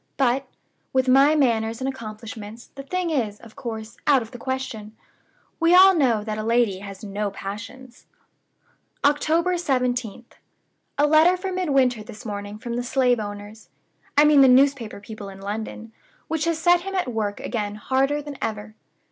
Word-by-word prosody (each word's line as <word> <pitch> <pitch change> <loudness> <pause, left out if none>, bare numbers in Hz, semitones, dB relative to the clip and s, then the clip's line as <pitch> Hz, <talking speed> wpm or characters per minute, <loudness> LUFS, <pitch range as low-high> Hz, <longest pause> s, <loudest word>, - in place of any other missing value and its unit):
But, 265 0 +1 0.5
with 260 0 +2
my 275 +4 +5
manners 230 -5 +1
and 260 - -2
accomplishments, 225 -2 -8
the 275 - -8
thing 355 +4 -2
is, 220 -8 -1
of 225 -1 -15
course, 230 -3 -7
out 275 -4 +5
of 225 - -13
the 245 - -10
question. 230 -5 -5 0.6
We 335 +1 +5
all 380 +1 +8
know 250 - +2
that 215 0 -4
a - - -3
lady 230 -4 +1
has 200 +1 -10
no 205 0 -3
passions." 220 +6 -9 1.0
"October 325 +5 +2
17th. 250 - -2 0.7
A 290 - +4
letter 315 +4 +5
for 380 +1 -4
Midwinter 275 -10 +1
this 210 +1 -11
morning 205 -1 -5
from 235 +2 -5
the 245 - -2
slave 250 -1 +2
owners 205 +1 -8 0.5
I 295 - +8
mean 300 -2 +6
the 270 - +8
newspaper 255 -4 +3
people 210 -1 -9
in 195 0 -11
London 220 +2 -6 0.4
which 320 -1 -1
has 335 -1 0
set 350 +1 +4
him 390 +1 -5
at 310 -10 -1
work 210 -2 -2
again 210 -3 -3
harder 270 +6 0
than 290 -2 -8
ever. 215 -1 -4
245 Hz, 165 wpm, -23 LUFS, 215-285 Hz, 1.0 s, all